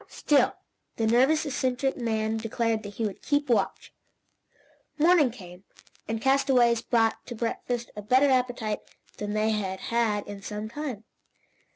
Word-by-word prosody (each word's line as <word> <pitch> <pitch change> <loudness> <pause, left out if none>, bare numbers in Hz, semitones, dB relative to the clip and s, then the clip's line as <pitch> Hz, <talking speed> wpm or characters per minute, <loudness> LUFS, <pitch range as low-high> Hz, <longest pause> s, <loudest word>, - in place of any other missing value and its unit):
Still 265 -3 +2 0.4
the 225 - 0
nervous, 265 +8 +3
eccentric 265 -1 -1
man 220 -2 -1
declared 225 0 -1
that 205 -1 -9
he 225 - -1
would 205 - -5
keep 290 -2 0
watch. 235 - 0 1.0
Morning 315 -3 +5
came, 185 -6 -12 0.4
and 225 0 -2
castaways 260 -3 +3
brought 225 -2 +1
to 240 - -6
breakfast 235 +1 -3
a 210 - -6
better 260 +6 +4
appetite 245 -4 0 0.4
than 205 0 -4
they 215 +1 +1
had 190 -3 -2
had 220 -3 +1
in 205 -1 -8
some 210 +1 -5
time. 260 -5 -5
235 Hz, 145 wpm, -27 LUFS, 215-260 Hz, 1.0 s, Morning